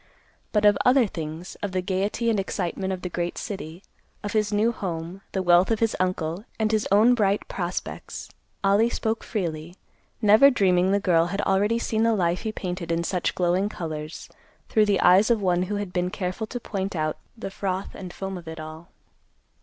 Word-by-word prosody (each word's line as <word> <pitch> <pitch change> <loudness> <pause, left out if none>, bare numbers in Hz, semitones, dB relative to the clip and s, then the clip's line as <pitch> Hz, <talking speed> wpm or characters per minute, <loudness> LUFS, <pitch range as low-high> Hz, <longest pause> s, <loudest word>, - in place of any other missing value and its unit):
But 210 -1 +2
of 205 - +5
other 250 0 +5
things, 165 -2 -6
of 200 -2 -3
the 185 - 0
gaiety 200 +5 0
and 215 - +1
excitement 190 0 -2
of 185 -1 -4
the - - -1
great 175 0 -3
city, 180 -3 -6 0.4
of 205 - -4
his 210 -1 +1
new 210 +3 +2
home, 175 -3 -5
the 190 - -1
wealth 175 +1 +5
of 225 -2 +1
his 225 -1 +1
uncle, 180 0 -1
and 220 -1 +1
his 215 -1 +1
own 215 +5 +6
bright 205 -4 +1
prospects, 175 -1 -5 0.4
Ollie 200 +4 +4
spoke 225 -1 -2
freely, 170 -5 -4 0.4
never 220 +6 +7
dreaming 190 -6 +3
the 200 - +3
girl 170 -4 +3
had 195 +3 -2
already 205 +4 +2
seen 220 -1 -1
the 230 0 +3
life 175 -2 +1
he 220 - -2
painted 180 -4 -4
in 165 0 0
such 180 0 -1
glowing 180 +3 +1
colors 155 -5 -6 0.4
through 215 -1 +3
the 200 -2 +2
eyes 190 +5 +6
of 235 -2 +3
one 180 -3 +1
who 195 +3 -2
had 205 -3 -4
been 180 0 0
careful 185 +3 -3
to 245 - -5
point 195 -4 -4
out 155 -1 -1 0.2
the 195 - -6
froth 190 0 -3
and 185 -2 -8
foam 190 -1 -5
of 170 - -15
it 160 0 -7
all. 155 +2 -9
190 Hz, 195 wpm, -25 LUFS, 175-210 Hz, 0.4 s, never